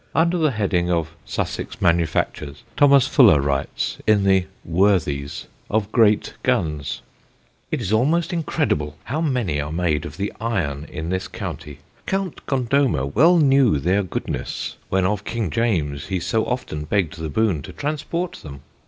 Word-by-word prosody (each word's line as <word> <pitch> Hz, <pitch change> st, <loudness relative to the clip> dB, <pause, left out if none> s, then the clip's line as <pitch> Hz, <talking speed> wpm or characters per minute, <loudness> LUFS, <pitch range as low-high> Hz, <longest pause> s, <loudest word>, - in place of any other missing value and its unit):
Under 170 Hz, +2 st, +3 dB
the 155 Hz, -2 st, +3 dB
heading 95 Hz, -7 st, 0 dB
of 85 Hz, -2 st, -1 dB
Sussex -, -, -4 dB
manufactures, 80 Hz, -3 st, 0 dB
Thomas 140 Hz, -2 st, +6 dB
Fuller 75 Hz, -, +6 dB
writes, 70 Hz, 0 st, -2 dB
in 105 Hz, -2 st, +4 dB
the 95 Hz, -1 st, +3 dB, 0.2 s
Worthies, 85 Hz, -6 st, +1 dB, 0.2 s
of 110 Hz, 0 st, 0 dB
great 110 Hz, -3 st, +3 dB
guns: 80 Hz, -, -1 dB, 0.7 s
"It -, -, -2 dB
is 100 Hz, -, -2 dB
almost 160 Hz, +10 st, +2 dB
incredible 145 Hz, -, -1 dB
how 150 Hz, +7 st, -3 dB
many 120 Hz, -, 0 dB
are 75 Hz, +1 st, -5 dB
made 80 Hz, -2 st, 0 dB
of 75 Hz, +2 st, -11 dB
the 100 Hz, +1 st, -3 dB
Iron 80 Hz, -11 st, -2 dB
in 80 Hz, +1 st, -6 dB
this 95 Hz, 0 st, -2 dB
County. 75 Hz, -2 st, -7 dB, 0.3 s
Count 195 Hz, -3 st, -2 dB
Gondomer 130 Hz, -, +1 dB
well 155 Hz, -, +4 dB
knew 135 Hz, -, +4 dB
their 90 Hz, +8 st, +1 dB
goodness, 95 Hz, -, -4 dB
when 95 Hz, -1 st, +1 dB
of 100 Hz, +1 st, 0 dB
King 110 Hz, -7 st, -3 dB
James 80 Hz, -10 st, -1 dB
he 95 Hz, -2 st, -1 dB
so 110 Hz, +6 st, 0 dB
often 75 Hz, -12 st, -3 dB
begg'd 85 Hz, -1 st, -1 dB
the 80 Hz, -1 st, -4 dB
boon 95 Hz, -2 st, +1 dB
to -, -, -9 dB
transport 155 Hz, +4 st, -3 dB
them. 70 Hz, -3 st, -10 dB
95 Hz, 155 wpm, -22 LUFS, 75-125 Hz, 0.7 s, Thomas